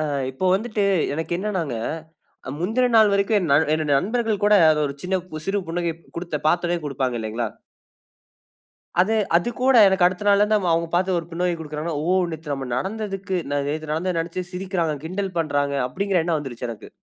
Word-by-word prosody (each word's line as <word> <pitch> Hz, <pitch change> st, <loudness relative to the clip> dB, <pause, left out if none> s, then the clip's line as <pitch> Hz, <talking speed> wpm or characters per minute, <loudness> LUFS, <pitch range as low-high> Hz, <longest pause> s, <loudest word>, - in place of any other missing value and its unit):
ஆ -, -, 0 dB, 0.3 s
இப்ப 130 Hz, +8 st, -1 dB
வந்துட்டு, 210 Hz, 0 st, -1 dB, 0.3 s
எனக்கு 160 Hz, +3 st, -4 dB
என்னானாங்க, 185 Hz, -, -2 dB, 0.8 s
முந்தின 225 Hz, +9 st, +1 dB
நாள் 215 Hz, -2 st, +6 dB
வரைக்கும் 200 Hz, +2 st, +2 dB
என் 175 Hz, -6 st, -2 dB
நல் 150 Hz, +2 st, +4 dB
என்னுடைய 155 Hz, -2 st, +1 dB
நண்பர்கள் 220 Hz, 0 st, -1 dB
கூட 210 Hz, -, +4 dB, 0.2 s
அத 155 Hz, -, +2 dB
ஒரு 140 Hz, -, -5 dB
சின்ன 185 Hz, +1 st, -2 dB, 0.2 s
பு 155 Hz, -, -7 dB
சிறு 195 Hz, +1 st, +1 dB
புன்னகை 170 Hz, 0 st, -1 dB, 0.2 s
குடுத்த 170 Hz, -2 st, -3 dB
பாத்தவன்னே 175 Hz, +2 st, +2 dB
குடுப்பாங்க 130 Hz, -3 st, -2 dB
இல்லைங்களா? 110 Hz, +2 st, -2 dB, 1.5 s
அத 185 Hz, -, +3 dB, 0.3 s
அது 175 Hz, +7 st, +1 dB
கூட 260 Hz, 0 st, +4 dB
எனக்கு 190 Hz, -1 st, +3 dB
அடுத்த 185 Hz, +3 st, -2 dB
நாள்ல 200 Hz, 0 st, +5 dB
இருந்து 210 Hz, +1 st, +3 dB
அவுங்க 165 Hz, 0 st, 0 dB
பாத்து 185 Hz, +1 st, +2 dB
ஒரு 165 Hz, -, -6 dB
புன்னகை 175 Hz, +1 st, 0 dB
குடுக்கிறாங்கன்னா, 155 Hz, 0 st, -4 dB
"ஓ! 180 Hz, -, +1 dB, 0.2 s
நேத்து 155 Hz, -2 st, -5 dB
நம்ம 135 Hz, -2 st, -5 dB
நடந்ததுக்கு 195 Hz, +3 st, -3 dB, 0.2 s
ந 145 Hz, -, +1 dB
நேத்து 155 Hz, +1 st, -4 dB
நடந்தத 180 Hz, +4 st, -1 dB
நெனைச்சு 170 Hz, +2 st, -4 dB
சிரிக்கிறாங்க, 180 Hz, -4 st, -1 dB
கிண்டல் 190 Hz, +2 st, -4 dB
பண்றாங்க" 145 Hz, -3 st, 0 dB
அப்டிங்கிற 195 Hz, +5 st, 0 dB
எண்ணம் 165 Hz, -2 st, +1 dB
வந்துருச்சு 130 Hz, -4 st, -6 dB
எனக்கு. 115 Hz, -, -9 dB
175 Hz, 175 wpm, -23 LUFS, 155-195 Hz, 1.5 s, நாள்